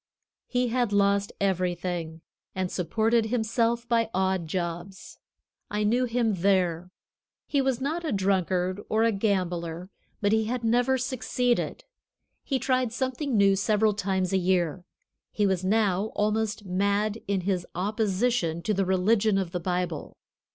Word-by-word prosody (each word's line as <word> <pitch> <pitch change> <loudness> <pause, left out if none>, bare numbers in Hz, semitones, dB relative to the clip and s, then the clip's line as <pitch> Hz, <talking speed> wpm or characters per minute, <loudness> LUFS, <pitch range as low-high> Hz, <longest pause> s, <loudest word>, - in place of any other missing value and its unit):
He 245 -1 0
had 240 -2 0
lost 200 0 +2
everything, 175 -3 -1 0.3
and 185 -1 -2
supported 220 +5 +1
himself 235 +1 0
by 230 -2 +2
odd 190 -2 0
jobs. 175 +2 -5 0.5
I 210 0 -1
knew 240 +4 +2
him 235 -2 +1
there. 180 -3 +1 0.6
He 280 - +1
was 265 -2 0
not 310 +6 -2
a 315 - -2
drunkard 185 -1 0
or 220 +1 +2
a 230 - +4
gambler, 180 -4 -2 0.3
but 205 -1 +1
he 220 0 +2
had 240 +2 -3
never 245 +3 +2
succeeded. 250 -1 -1 0.6
He 270 - 0
tried 255 -2 0
something 260 +1 -1
new 200 -1 +5
several 210 +2 +2
times 190 -2 -1
a 190 - +3
year. 180 -2 0 0.5
He 210 - +1
was 190 -2 +1
now 200 -1 +2
almost 210 0 0
mad 200 +3 0
in 195 -2 0
his 185 -1 -1
opposition 200 -2 0
to 215 - 0
the 195 -1 +1
religion 200 +3 +2
of 190 -3 -2
the 180 - -2
Bible. 175 -2 -3
200 Hz, 145 wpm, -27 LUFS, 185-230 Hz, 0.6 s, new